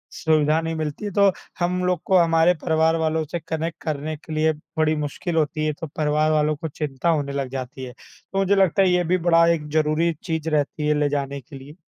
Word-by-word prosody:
सुविधा 155 -1 +2
नहीं 165 0 -3
मिलती 155 +5 -4
है 205 - -3
तो 200 0 +4 0.3
हम 180 +1 0
लोग 180 -2 0
को 190 - +4
हमारे 165 0 +4
परिवार 160 0 +2
वालों 160 0 0
से 175 - -2
कनेक्ट 160 +1 -4
करने 155 0 -3
के 160 +1 -9
लिए 155 +1 +2 0.2
बड़ी 155 0 +2
मुश्किल 150 +3 -3
होती 155 -1 0
है 155 - 0
तो 165 - -4
परिवार 150 +1 0
वालों 155 0 +2
को 160 +2 -5
चिंता 150 +1 -3
होने 145 -3 0
लग 135 -2 -2
जाती 130 0 -6
है। 125 - -9
तो 195 - -12
मुझे 195 +1 +3
लगता 195 0 +3
है 190 - +4
ये 180 0 +2
भी 180 +2 +1
बड़ा 165 0 +6
एक 150 -2 -4
ज़रूरी 155 +2 +1
चीज़ 160 -2 -2
रहती 150 0 -1
है 150 - +3
ले 145 -1 +2
जाने 140 -1 -3
के 135 +3 -12
लिए। 140 +3 -12
155 Hz, 225 wpm, -23 LUFS, 150-165 Hz, 0.3 s, बड़ा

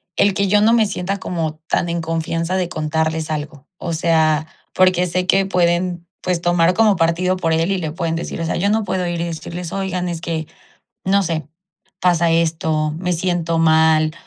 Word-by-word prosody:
el 200 - +3
que 200 0 0
yo 210 - +4
no 220 +2 +4
me 230 -2 +4
sienta 195 0 -3
como 165 -5 -3
tan 175 - +1
en 170 0 -2
confianza 165 +2 -2
de 180 -2 0
contarles 160 0 -2
algo. 150 -2 -5
O 170 -1 -4
sea, 160 -1 +2 0.3
porque 185 -1 +3
sé 180 +1 -1
que 195 +1 +3
pueden, 175 -1 0
pues, 180 -2 -1
tomar 175 0 +3
como 215 -1 +3
partido 180 +3 +1
por 165 -3 0
él 165 +4 +1
y 195 - +1
le 160 -4 -3
pueden 165 -2 -2
decir", 165 - -5
o - - -1
sea, - - -1
yo 200 +3 +1
no 220 +1 +1
puedo 185 -2 -2
ir 170 -1 -2
y - - -1
decirles: 170 +1 -6
"Oigan, 185 -2 -2
es 170 -1 -4
que 165 -2 -3 0.6
no 200 +1 +3
sé, 160 -4 -3 0.5
pasa 170 -2 +3
esto, 160 -2 +1
me 180 +1 -2
siento 170 -1 -1
mal 160 -1 +4
170 Hz, 200 wpm, -19 LUFS, 160-185 Hz, 0.6 s, yo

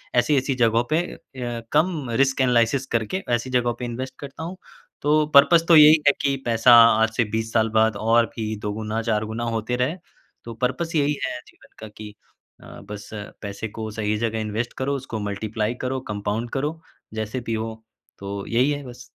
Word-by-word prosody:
ऐसी-ऐसी 135 +1 +2
जगहों 115 -1 +2
पे 160 - +4
अ, 120 -3 -7
कम 155 -4 +1
रिस्क 135 0 0
एनालिसिस 125 +1 +2
करके, 115 - -1
ऐसी 120 +2 -4
जगहों 120 -1 +1
पे 125 - -3
इन्वेस्ट 125 +2 -5
करता 140 +3 -8
हूँ, 180 +3 -6 0.4
तो 150 +1 +3
पर्पस 165 +4 +7
तो 170 - +7
यही 155 0 +8
है 145 - +7
कि 140 -1 +1
पैसा 115 +1 +5 0.3
आज 115 - +4
से 120 - +4
20 110 0 -2
साल 110 -1 +2
बाद 110 -1 +2
और 115 +1 +4
भी 110 -1 -3
2 105 0 -3
गुना, 110 +1 -3
4 110 -2 -1
गुना 110 +2 -4
होते 110 +3 -2
रहे। 150 +9 0 0.5
तो 115 - -7
परपस 130 +8 -2
यही 145 0 +2
है 125 - -4
जीवन - - -21
का 110 - -8
कि 105 -1 -9 0.5
अ, - - -15 0.2
बस 105 -1 -8 0.3
पैसे 100 +1 -5
को 110 -1 -4
सही 105 0 -1
जगह 110 0 -2
इन्वेस्ट 110 +2 -3
करो, 140 +2 -1
उसको 125 -5 -5
मल्टीप्लाई 105 +2 -3
करो, 130 0 -2
कम्पाउन्ड 105 +3 -3
करो, 150 +4 -2 0.3
जैसे 110 +3 -3
भी 115 - -2
हो। 110 0 -3 0.4
तो 100 0 -5
यही 125 +5 +2
है 145 -1 -3
बस। 120 0 -11
120 Hz, 190 wpm, -23 LUFS, 110-135 Hz, 0.5 s, यही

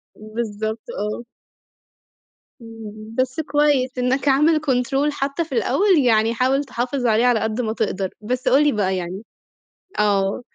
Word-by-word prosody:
بالضبط 215 0 -4 0.2
آه. 210 +3 -4 1.4
إمم، 220 -1 -10
بس 260 +4 0
كويس 290 -3 +2
إنك 255 +3 0
عامل 300 +3 +4
Control، 270 +2 +1
حتّى 280 +3 -2
في 310 - -15
الأول 330 - +2
يعني 225 -3 +3
حاول 260 +4 +1
تحافظ 250 0 -3
عليه 225 +1 +3
على 245 -2 +3
قد 220 +2 -1
ما 220 -2 -2
تقدر، 195 -4 -2
بس 250 +4 -3
قُل 275 +3 +5
لي 295 - +3
بقى 190 -4 0
يعني 185 +4 -5 0.8
آه 200 0 +1
245 Hz, 140 wpm, -21 LUFS, 215-275 Hz, 1.4 s, قُل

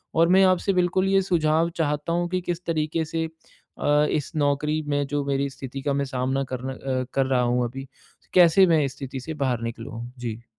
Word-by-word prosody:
और 165 +1 +5
मैं 190 +1 +6
आपसे 185 +1 +2
बिल्कुल 185 +1 +2
ये 195 0 +4
सुझाव 165 -2 +2
चाहता 150 +1 -1
हूँ 175 0 0
कि 185 0 -1
किस 175 0 -4
तरीके 160 0 -1
से 160 +1 -2 0.5
अ, 150 +1 +3
इस 150 -3 -2
नौकरी 150 +1 +1
में 145 -1 0
जो 145 0 -1
मेरी 140 0 0
स्थिति 135 0 -7
का 140 0 0
मैं 140 0 0
सामना 130 +1 -1
करना 130 +1 -4
अ, 130 -1 -3
कर 135 - +2
रहा 130 -1 +2
हूँ 125 0 +1
अभी 135 +2 -8 0.5
कैसे 180 +1 +6
मैं 160 -3 +4
इस 135 0 -5
स्थिति 135 -1 -6
से 160 - -6
बाहर 130 -5 -1
निकलूँ? 115 0 -6
जी। 115 -1 -5
145 Hz, 205 wpm, -24 LUFS, 130-165 Hz, 0.5 s, मैं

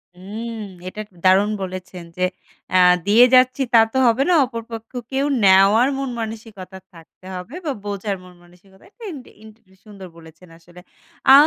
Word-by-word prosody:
হুম, 215 +6 -7 0.3
এটা 210 - -8
এক - - -35
দারুণ 195 +3 +4
বলেছেন 185 -1 -7
যে, 180 - -1 0.5
আ - - +4 0.3
দিয়ে 230 +4 +7
যাচ্ছি 255 +2 +4
তা 230 - +8
তো - - -1
হবে 240 +4 +2
না। - - +4
অপর 230 -2 -7
পক্ষে 225 +3 -7
কেউ 270 +1 0 0.2
নেওয়ার 195 +6 +5
মন 275 -1 -3
মানসিকতা 215 -4 -8 0.2
থাকতে 165 +2 -18
হবে 180 - -8
বা 290 - -1
বোঝার 200 -1 -3
মন 180 0 -15
মানসিকতা, 190 +2 -22
এটা 460 +2 -18
ইন 295 - -8 0.2
ইন 220 - -13 0.4
সুন্দর 200 -3 -11
বলেছেন 160 +2 -16
আসলে। 175 +1 -17 0.5
আ - - +10
205 Hz, 170 wpm, -20 LUFS, 185-230 Hz, 0.5 s, আ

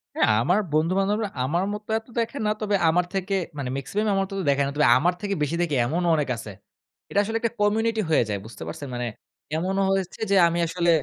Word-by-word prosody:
হ্যাঁ। - - +3
আ - - +4
আমার 180 +8 +3
বন্ধু-বান্ধবরা 195 +6 +1
আমার 170 +8 0
মত 210 0 -6 0.2
এত 225 - -24
দেখে 230 +5 -2
না। - - +2
তবে 205 -1 +1
আমার 175 +2 +2
থেকে 195 +1 -2 0.2
মানে 130 -3 -3
মেক্সিমাম 210 +10 -2
আমার 195 - +2
মত 195 - -8 0.2
দেখে 140 0 +3
না। - - -2
তবে 150 -3 +4
আমার 175 +6 +2
থেকে 200 -1 -1
বেশি 150 +3 0
দেখে 155 -5 0
এমনও 170 +6 0
অনেক 145 -3 -1
আছে। 110 - -8 0.6
এটা 200 - +1
আসলে 225 +2 -1
একটা 230 - 0
community 220 +2 +2
হয়ে 140 - +4
যায়। 100 - -1
বুঝতে 110 -7 -9
পারছেন? 140 +12 -6
মানে 120 0 -2 0.5
এমনও 190 +4 0
হয়েছে 195 -2 -2
যে - - +5
আমি 170 +1 -1
আসলে 175 +1 0
180 Hz, 220 wpm, -25 LUFS, 150-205 Hz, 0.6 s, যে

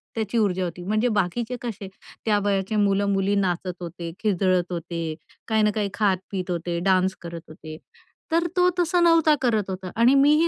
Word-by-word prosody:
त्याची 220 0 -2
ऊर्जा 190 -4 +1
होती. 175 0 -6
म्हणजे 215 +4 +1
बाकीचे 220 +4 -1
कसे 215 -5 -5 0.4
त्या 210 -2 +3
वयाचे 195 +1 0
मुलं-मुली 200 -1 +2
नाचत 180 -2 -1
होते, 170 -1 -6
खिदळत 185 -3 +1
होते, 170 -2 -4 0.3
काही 220 -1 +2
ना 210 - +3
काही 205 -2 0
खात 205 -3 +2
पीत 185 -2 -3
होते, 170 0 -2
डान्स 190 +1 +2
करत 170 -1 -7
होते 155 0 -10 0.5
तर 335 +1 +2
तो 360 0 +5
तसा 350 0 +2
नव्हता 330 -3 +5
करत 220 -6 +1
होता, 185 -1 -5
आणि 235 +4 +5
मी 280 +2 +5
ही 335 - +4
200 Hz, 180 wpm, -24 LUFS, 180-225 Hz, 0.5 s, तो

